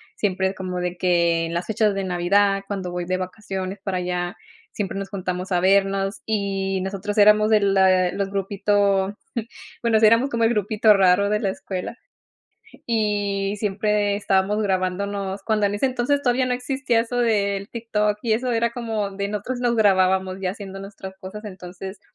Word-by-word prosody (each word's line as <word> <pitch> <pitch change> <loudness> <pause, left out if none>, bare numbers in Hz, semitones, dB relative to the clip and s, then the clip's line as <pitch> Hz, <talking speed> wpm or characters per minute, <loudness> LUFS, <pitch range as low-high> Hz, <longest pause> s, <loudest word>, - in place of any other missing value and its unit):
siempre 190 -2 0
es 195 - -7
como 185 -1 -4
de 180 0 -2
que 170 -2 +2
en 165 - -5
las 170 - -2
fechas 215 -2 +1
de 195 - -2
Navidad, 195 +2 +2
cuando 190 -3 -4
voy 175 0 -3
de 185 +1 -1
vacaciones 190 0 -5
para 195 -3 -2
allá, 180 0 -3 0.3
siempre 195 -1 -3
nos 195 - -5
juntamos 185 -1 -4
a 180 - +3
vernos. 195 +1 +2
Y 195 -2 -1
nosotros 200 +2 -4
éramos 210 +1 +6
de 215 -1 +5
la 190 -2 +3
los 200 -1 -2
grupito, 200 0 +1 0.6
bueno, 230 -2 +3
o - - -1
sea, 220 - +7
éramos 230 +5 +4
como 235 -2 -1
el 225 - +4
grupito 215 0 +3
raro 195 0 +4
de 210 - +2
la 205 -3 -1
escuela. 190 +3 -5 0.9
Y 205 -3 0
siempre 210 0 0
estábamos 200 0 +1
grabándonos, 195 +1 -2
cuando 215 -1 +2
en 200 - -2
ese 205 - +1
entonces 260 +2 0
todavía 255 0 +2
no 250 - +1
existía 250 -2 0
eso 235 +1 -4
del 200 -3 +1
TikTok 210 -3 -1
y 230 -2 +2
eso. 245 +3 -1
Era 230 0 +1
como 225 -4 -3
de 200 +1 -3
nosotros 210 +5 -4
nos 240 -1 +1
grabábamos 190 -3 +2
ya 185 - 0
haciendo 195 -1 -8
nuestras 195 -1 -9
cosas, 210 +3 -8
entonces 190 0 -8
200 Hz, 180 wpm, -23 LUFS, 190-215 Hz, 0.9 s, sea